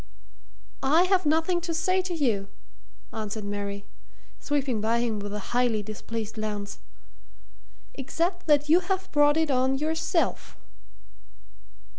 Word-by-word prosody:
"I 300 +6 +4
have 370 -3 +2
nothing 325 +3 +2
to 335 -1 -3
say 370 +3 +2
to 365 -1 -4
you," 225 -10 +1 0.7
answered 215 0 -4
Mary, 200 0 -4 0.5
sweeping 275 -6 -1
by 225 +2 +2
him 230 -3 -1
with 205 0 -5
a 210 +2 -6
highly 240 -4 +2
displeased 215 +1 -5
glance. 210 -2 -4 1.1
"Except 340 +7 -2
that 295 -1 +4
you 325 +4 +6
have 380 +1 -3
brought 295 0 +4
it 320 -2 +2
on 260 +1 +2
yourself." 320 +3 -1
270 Hz, 125 wpm, -27 LUFS, 215-325 Hz, 1.1 s, you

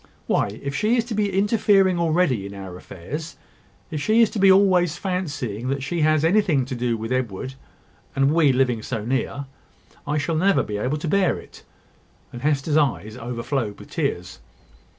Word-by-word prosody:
Why, 100 +2 0
if 140 0 -3
she 215 - +1
is 230 - +1
to 235 - -5
be 205 -1 0
interfering 195 -2 +3
already 160 - +1
in 100 - -9
our 95 -2 -8
affairs 140 - -8 0.5
if 155 -2 -3
she 220 +6 +3
is 220 - +1
to 215 - -3
be 195 0 +7
always 185 -4 +4
fancying 145 - -3
that 135 0 -2
she 165 +4 -2
has 155 0 +3
anything 165 -7 +3
to 130 - -6
do 120 -1 -1
with 115 +2 -5
Edward, 130 0 -2 0.6
and 135 +2 +3
we 160 -4 +4
living 125 -3 +1
so 110 0 -4
near, 135 +3 -2 0.6
I 150 +1 0
shall 150 +3 -1
never 195 +4 +3
be 105 - -4
able 130 +8 -1
to 155 - -5
bear 190 +1 +2
it." - - -13 0.7
And 120 - -7
Hester's 150 +1 +1
eyes 120 -7 0
overflowed 120 -2 -3
with - - -13
tears. - - -3
145 Hz, 180 wpm, -23 LUFS, 125-180 Hz, 0.7 s, be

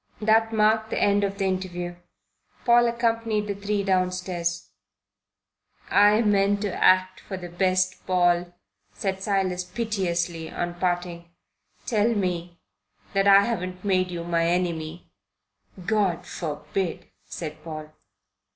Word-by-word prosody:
That 225 +1 +3
marked 220 0 +2
the - - -1
end 205 0 +3
of 200 0 -2
the 195 - 0
interview. 180 -2 -3 0.7
Paul 240 0 +5
accompanied 230 -2 0
the 205 - -2
three 200 0 -2
downstairs. 180 -2 -1 1.2
"I 210 +2 +5
meant 200 -1 +2
to 200 -3 -2
act 185 0 +4
for 190 - -7
the 175 -1 -8
best, 185 +1 0
Paul," 175 -1 +2 0.4
said 190 -1 -3
Silas 190 -3 0
piteously, 180 -6 -2
on 175 0 -3
parting. 175 -1 -2 0.6
"Tell 225 0 +2
me 175 -3 -2 0.6
that 195 0 +2
I 200 0 +8
haven't 185 -4 -3
made 185 -2 +2
you 170 -1 -4
my 170 -1 +1
enemy." 170 -2 -2 0.7
"God 200 -5 +1
forbid," 170 +3 -4 0.2
said 155 -3 -7
Paul. 155 -2 -7
185 Hz, 125 wpm, -25 LUFS, 175-205 Hz, 1.2 s, I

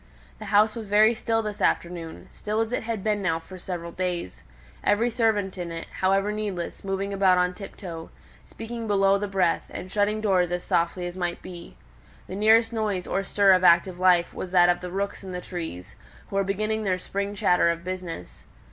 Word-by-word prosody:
The 215 - -7
house 210 +1 +4
was 225 -3 -7
very 215 +3 +5
still 225 0 -1
this 210 -1 -5
afternoon, 170 -2 -1
still 215 +1 -3
as 225 0 0
it - - -1
had 220 -3 -4
been 210 -1 0
now 170 -4 +1
for 185 +3 -11
several 175 -2 -5
days; 175 - -4 0.4
every 230 +4 +2
servant 215 -5 0
in 175 -1 -4
it, 165 0 -5
however 195 +2 +2
needlessly, 200 -3 -4
moving 195 +1 -2
about 190 -2 +4
on 180 0 +2
tiptoe, 180 -4 -8 0.3
speaking 230 0 -7
below 195 -1 +3
the 205 - -2
breath, 190 -3 +1
and 185 - -8
shutting 210 +1 +1
doors 185 -5 +2
as 175 0 -2
softly 170 +2 0
as 175 0 -5
might 175 -2 -3
be. 175 -2 -10 0.5
The - - -9
nearest 225 +3 +4
noise 210 -5 -1
or 195 - -1
stir 200 +1 +4
of 185 0 +3
active 175 +1 +4
life 180 -2 +4
was 185 - -5
that 175 -1 +6
of 175 - +1
the 180 - -5
rooks 195 +2 -3
in 190 -1 -7
the 180 - -3
trees, 160 - -7 0.4
who - - -5
were 195 - +3
beginning 215 +3 -1
their 185 -3 +1
spring 200 +2 -4
chatter 180 -3 +3
of 170 0 -2
business. 180 - -7
190 Hz, 200 wpm, -25 LUFS, 175-210 Hz, 0.5 s, that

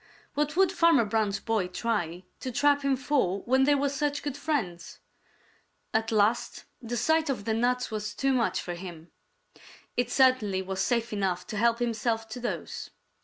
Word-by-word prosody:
What 295 +2 -1
would 380 -1 +5
Farmer 335 - +4
Brown's 210 -2 0
boy 220 -4 0
try 180 -3 -2 0.2
to 255 - -4
trap 285 +3 +3
him 275 -1 +2
for 255 -8 0
when 260 +2 +3
they 290 +1 +4
were 280 0 +1
such 285 +1 -1
good 290 -2 -3
friends? 245 - -3 1.0
At 225 +1 +1
last 215 +1 +1 0.2
the 240 0 -4
sight 315 +6 +2
of 245 -7 -2
the 220 - 0
nuts 245 +2 0
was 210 -1 -4
too 270 +3 +1
much 245 -3 +1
for 175 - -5
him. 175 -2 -9 0.8
It 245 -1 0
certainly 245 -8 +3
was 190 0 -3
safe 235 +2 0
enough 190 -3 -1
to - - -6
help 230 +2 +3
himself 230 -1 -1
to 220 - -6
those. 245 - -4
235 Hz, 170 wpm, -28 LUFS, 205-275 Hz, 1.0 s, would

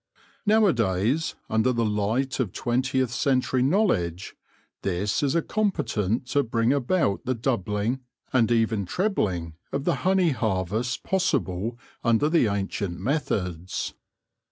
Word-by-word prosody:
Nowadays, 140 - +2
under 110 +3 +2
the 115 -2 +1
light 110 +6 0
of 115 -8 -1
twentieth 130 0 0
century 130 -1 +1
knowledge, 130 - +1 0.5
this 100 +2 0
is 145 +2 +2
competent 125 - 0
to 145 - +3
bring 115 0 +1
about 140 - +1
the 130 - 0
doubling, 110 0 -1 0.3
and 120 -3 +3
even 110 -4 +1
trebling, 95 - -1 0.2
of 140 - -2
the 175 - +1
honey 185 -2 +3
harvest 110 +1 -1
possible 120 - 0 0.3
under 115 +6 +3
the 165 -8 +4
ancient 100 -3 -2
methods. 95 - -2
120 Hz, 115 wpm, -25 LUFS, 100-140 Hz, 0.5 s, the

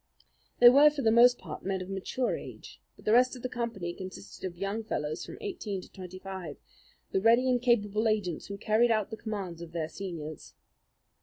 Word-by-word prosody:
They 240 - +10
were, 285 +4 +7
for 295 -2 -4
the 220 - +4
most 245 +2 +6
part, 155 -4 -8
men 190 0 -1
of 185 - -6
mature 195 +6 -2
age; - - -10
but - - -19
the 215 - +2
rest 250 +2 +5
of 250 - -11
the 255 - -2
company 230 -8 -3
consisted 185 +2 -10
of 175 -1 -10
young 200 +4 -3
fellows 150 -7 -3
from - - -9
eighteen 350 - -4
to - - -13
twenty 185 -1 -9
five, 185 -5 -7 0.5
the 190 - +1
ready 235 +4 +5
and 250 -1 +2
capable 220 -3 +2
agents 205 -6 -1
who 200 - -6
carried 220 +4 +3
out 215 -2 +1
the - - -3
commands 195 -7 -5
of 170 -1 -9
their 160 -2 -2
seniors. 165 -6 -7
205 Hz, 205 wpm, -29 LUFS, 185-235 Hz, 0.5 s, They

